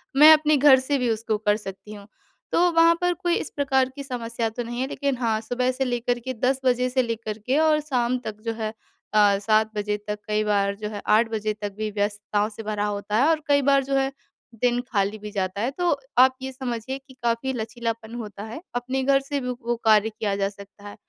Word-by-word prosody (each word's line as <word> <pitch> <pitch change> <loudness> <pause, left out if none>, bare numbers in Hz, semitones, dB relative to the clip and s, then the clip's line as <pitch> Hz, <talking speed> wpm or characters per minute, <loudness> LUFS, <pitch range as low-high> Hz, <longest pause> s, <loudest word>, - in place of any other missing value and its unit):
मैं 305 +3 +9
अपने 305 -1 +3
घर 270 -1 +7
से 280 +2 0
भी 250 -3 0
उसको 220 -1 -1
कर 210 -1 +2
सकती 210 +1 -9
हूँ। 200 -1 -11 0.4
तो 355 +1 +4
वहाँ 335 0 +5
पर 355 0 +2
कोई 350 0 0
इस - - -3
प्रकार 265 -2 +2
की 280 - -6
समस्या 235 -3 -3
तो 240 +2 -5
नहीं 240 +1 -5
है 265 - -1
लेकिन 280 -1 -1
हाँ, 225 -3 0
सुबह 250 +2 0
से 265 +1 -2
लेकर 245 0 -1
के 260 +2 -5
10:00 255 +3 0
बजे 250 0 +2
से 255 +1 +2
लेकर 225 -2 -4
के 265 +3 +2
और 310 -1 +4
शाम 255 -4 0
तक 215 -1 -6
जो 230 - -1
है 220 -1 -4 0.4
अ, 205 -2 +5
7:00 215 +1 +2
बजे 210 0 -1
तक 210 0 -3
कई 215 0 +1
बार 200 -1 +1
जो 210 +1 -5
है 205 -1 -6
8:00 225 +2 +4
बजे 215 -1 -2
तक 205 -1 -3
भी 215 0 -2
व्यस्तताओं 205 0 -1
से 220 +1 -9
भरा 210 -1 -2
होता 205 0 -3
है - - +4
और 315 -1 +2
कई 285 -1 +4
बार 275 0 +3
जो 275 +1 -1
है 270 0 +1 0.5
दिन 245 -1 +2
खाली 205 0 0
भी 210 0 -8
जाता 190 -1 -2
है। 245 +4 0
तो 350 +4 0 0.3
आप 260 0 +6
ये 265 0 -4
समझिए 255 0 -4
कि 270 -1 -17
काफ़ी 235 +3 0
लचीलापन 230 -1 -4
होता 210 -3 -7
है। 225 +8 -7
अपने 255 +2 -1
घर 275 +1 +4
से 280 +1 -3
भी 250 - -4
वो 240 -1 -2
कार्य 215 0 +5
किया 210 -2 -2
जा 195 0 0
सकता 200 0 -14
है। - - -11
235 Hz, 235 wpm, -24 LUFS, 210-265 Hz, 0.5 s, मैं